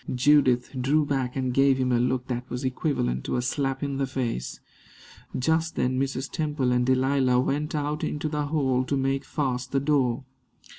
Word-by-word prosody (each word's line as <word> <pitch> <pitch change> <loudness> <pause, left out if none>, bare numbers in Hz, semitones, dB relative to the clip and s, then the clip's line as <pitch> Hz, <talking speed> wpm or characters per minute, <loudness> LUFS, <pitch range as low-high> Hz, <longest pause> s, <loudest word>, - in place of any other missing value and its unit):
Judith 125 -2 +3
drew 145 +4 +2
back 135 -3 -1
and 130 -2 -1
gave 135 0 +4
him 130 -1 0
a 120 - +3
look 125 +1 0
that 125 0 -4
was 125 +2 -4
equivalent 125 - -1
to - - -2
a 125 - +1
slap 135 +1 -1
in 140 -1 -2
the 135 -1 0
face. 120 - -3 0.8
Just 160 +4 0
then 130 +1 0
Mrs. 135 0 -2
Temple 150 -6 -1
and 125 0 +2
Delilah 130 -1 +3
went 145 +4 -1
out 150 +1 -2
into 150 +1 -2
the 150 -1 -2
hall 135 -4 +1
to 140 - -1
make 135 +1 0
fast 125 -4 -2
the 140 - +2
door. 135 -3 +1
135 Hz, 185 wpm, -26 LUFS, 125-145 Hz, 0.8 s, gave